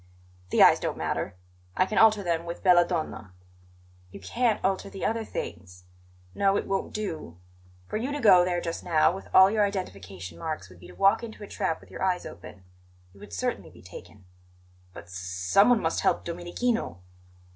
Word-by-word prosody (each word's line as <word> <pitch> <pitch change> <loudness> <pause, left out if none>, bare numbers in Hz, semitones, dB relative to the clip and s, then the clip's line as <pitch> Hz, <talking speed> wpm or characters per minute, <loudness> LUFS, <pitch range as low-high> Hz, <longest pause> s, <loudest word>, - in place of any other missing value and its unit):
"The - - +5
eyes - - +7
don't - - -3
matter; - - -3 0.4
I 185 - +4
can 210 - 0
alter 215 -2 +5
them 170 -1 -1
with 170 - -6
belladonna." 175 - +2 0.7
"You - - -11
can't 235 -3 0
alter 195 +1 -1
the 195 - -5
other 225 0 0
things. 90 - -7 0.5
No, 195 0 +2
it - - -2
won't 195 0 -2
do. 160 - -5 0.5
For 215 - -4
you 250 +6 -3
to 290 - -3
go 190 -7 +7
there 175 -1 0
just 165 -1 -4
now, 165 -1 +3
with 190 - -8
all 190 +1 +7
your 215 -1 +2
identification 95 - -5
marks, 155 - -5
would 90 - -16
be 90 - -13
to 90 - -14
walk 195 - +4
into 220 -2 -9
a - - -8
trap 160 - -2
with - - -18
your - - -9
eyes 185 -1 0
open. 95 0 -11 0.5
You 100 - -18
would 100 0 -12
certainly 95 - -3
be - - -17
taken." 100 -2 -13 0.7
"But 85 - -10
s 85 - -18
s 95 - -6 0.3
someone 225 +4 +6
must 160 - 0
help - - +1
Domenichino." 175 - -3
175 Hz, 190 wpm, -27 LUFS, -, 0.7 s, eyes